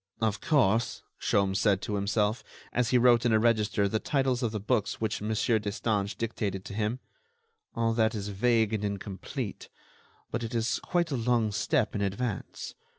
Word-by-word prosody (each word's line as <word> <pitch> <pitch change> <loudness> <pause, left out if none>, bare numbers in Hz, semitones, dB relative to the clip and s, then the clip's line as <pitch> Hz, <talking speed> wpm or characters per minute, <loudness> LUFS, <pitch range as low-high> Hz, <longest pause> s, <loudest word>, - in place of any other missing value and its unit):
"Of 110 -2 0
course," 120 -6 +2 0.2
Sholmes 100 -1 +1
said 100 -3 +3
to 105 - -3
himself, 105 +2 0 0.3
as 125 -1 +1
he 125 - +4
wrote 120 -1 +5
in 120 - +2
a - - +6
register 110 -3 +2
the 110 +2 0
titles 135 -2 0
of 120 -3 0
the 110 - -3
books 105 +1 0
which 110 -2 -2
Mon. 105 - -3
Destange 105 -1 0
dictated 105 -4 -3
to - - -7
him, 110 +3 -1 0.8
"all 115 -1 +1
that 110 0 +2
is 105 -1 -4
vague 110 +1 +2
and 105 -1 -1
incomplete, 100 +3 -5 0.6
but 115 - -2
it 115 +1 -4
is 115 0 0
quite 175 -3 0
a - - 0
long 115 -2 +1
step 110 +4 +1
in 105 - -2
advance. 100 +2 -3
110 Hz, 175 wpm, -29 LUFS, 105-120 Hz, 0.8 s, a